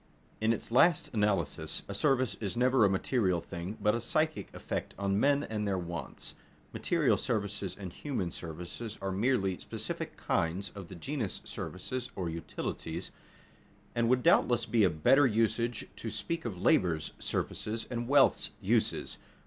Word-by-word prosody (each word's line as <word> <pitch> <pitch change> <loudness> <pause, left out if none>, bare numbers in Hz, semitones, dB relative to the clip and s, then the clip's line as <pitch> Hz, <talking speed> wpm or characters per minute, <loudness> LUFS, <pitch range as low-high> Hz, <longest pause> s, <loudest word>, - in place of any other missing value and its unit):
In 110 +1 +3
its 115 - -3
last 150 +7 +4
analysis 105 -8 0
a 100 - -4
service 130 +2 +2
is 105 +1 -3
never 125 -1 +4
a 100 - +6
material 95 -2 +1
thing, 85 +5 -6
but 105 - +3
a 115 - -1
psychic 155 +6 0
effect - - -4
on 100 0 +1
men 140 +3 +3
and 105 -1 -2
their 95 -1 +1
wants. 85 -1 -5 0.4
Material - - +2
services 100 -4 -2
and 95 -4 -6
human 115 - -3
services 90 +8 -6
are 95 0 -2
merely 95 -2 +1
specific - - -5
kinds 90 +4 0
of 100 -4 -8
the 95 - -9
genus 120 - -3
services 125 +7 -5
(or 85 -3 -2
utilities), 80 +1 -4 0.8
and 120 -1 +2
it - - +1
would 125 0 +3
doubtless 120 -1 +4
be 115 -3 +3
a 95 - +6
better 130 - +5
usage 115 0 +1
to 115 - -4
speak 165 +7 -3
of 100 -7 -4
labor's 85 -4 +2
services 110 +1 -2
and 120 -1 -2
wealth's 140 +1 +4
uses. - - 0
105 Hz, 155 wpm, -31 LUFS, 95-120 Hz, 0.8 s, a